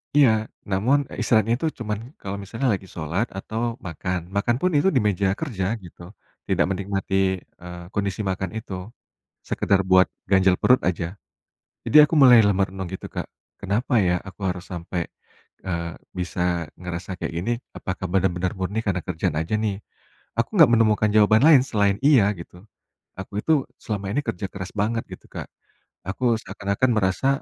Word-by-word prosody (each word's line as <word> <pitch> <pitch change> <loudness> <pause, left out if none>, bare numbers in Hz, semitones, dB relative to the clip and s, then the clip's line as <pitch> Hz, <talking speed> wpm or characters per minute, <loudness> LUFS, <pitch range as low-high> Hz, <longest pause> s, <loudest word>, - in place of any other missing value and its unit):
Iya, 145 -4 +7 0.4
namun, 110 +9 +3
eee, - - -7
istirahatnya 115 0 +3
itu 160 - 0
cuman 105 -2 -2 0.2
kalau 100 0 -4
misalnya 115 +7 -3
lagi 95 -1 -5
sholat 85 +8 -1
atau 115 +4 -3
makan, 90 +2 -3 0.2
makan 120 +4 +2
pun 185 - +2
itu 145 - +3
di 130 - +4
meja 100 -1 +1
kerja 115 - -3 0.2
gitu, 90 0 -13 0.5
tidak - - +2
menikmati, 95 0 -2 0.5
eee, 90 0 -8
kondisi 100 0 -1
makan 95 -1 -2
itu, 110 -3 -7 0.8
sekedar 100 -1 +2
buat 95 0 +7 0.2
ganjal 95 -1 +5
perut 125 0 +5
aja. 85 -1 -1 0.8
Jadi - - +2
aku 150 - -1
mulai 125 -5 +8
lah - - +4
merenung 95 -1 -2
gitu, 95 - -6
Kak, - - -3 0.3
kenapa 105 +7 -1
ya 90 0 +2
aku 100 0 -11
harus 90 -1 -4
sampai, 85 0 -3 0.6
eee, 85 -2 -2 0.3
bisa 90 +1 -3 0.4
ngerasa 90 +1 -6
kayak - - -4
gini? 115 +7 -1 0.2
Apakah 95 0 -4
benar-benar 95 -1 +1
murni 95 +3 -2
karena 95 -2 0
kerjaan 80 -4 -1
aja 80 +6 -2
nih? 105 -2 -1 0.6
Aku 115 - +2
nggak 150 -8 +8
menemukan 110 -2 +3
jawaban 110 +2 +5
lain 150 -5 +8
selain 100 -2 +2
iya 135 -8 +6
gitu. 85 - -11 0.6
Aku 95 - -8
itu, 160 - +1 0.3
selama 100 -2 -3
ini 145 - +1
kerja 95 - -2
keras 95 -2 -7
banget 115 +2 0
gitu, - - -10
Kak. - - -6 0.6
Aku 120 +5 +1
seakan-akan 100 +6 -1
merasa, 95 +6 +1
100 Hz, 160 wpm, -24 LUFS, 90-115 Hz, 0.8 s, mulai